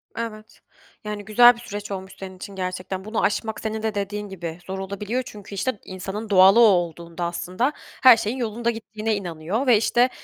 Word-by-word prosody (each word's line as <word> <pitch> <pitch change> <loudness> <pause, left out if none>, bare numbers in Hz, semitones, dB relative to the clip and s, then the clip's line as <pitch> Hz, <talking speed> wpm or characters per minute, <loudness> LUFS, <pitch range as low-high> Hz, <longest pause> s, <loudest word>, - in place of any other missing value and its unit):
Evet. 220 -2 -7 0.4
Yani, 210 -1 -5
güzel 240 +4 +7
bir - - -13
süreç 205 -2 -7
olmuş 190 -1 -6
senin 190 -1 -8
için 195 +1 -9
gerçekten. 185 +1 -4
Bunu 215 +1 -2
aşmak 220 +1 -1
senin 220 0 -4
de 220 -1 -1
dediğin 205 +1 -3
gibi 170 -3 -6
zor 190 0 -4
olabiliyor 205 +6 -3
çünkü, 205 -2 -10
işte, 215 +2 -2
insanın 195 +4 -6
doğalı 195 +2 +7
o - - +8
olduğunda 175 -4 +1
aslında 185 +9 -1 0.3
her 255 -3 +9
şeyin 220 +5 -2
yolunda 235 0 -1
gittiğine 220 -1 -3
inanıyor 185 - -3
ve, 235 - +7
işte, 240 +3 +3
205 Hz, 180 wpm, -23 LUFS, 190-225 Hz, 0.4 s, her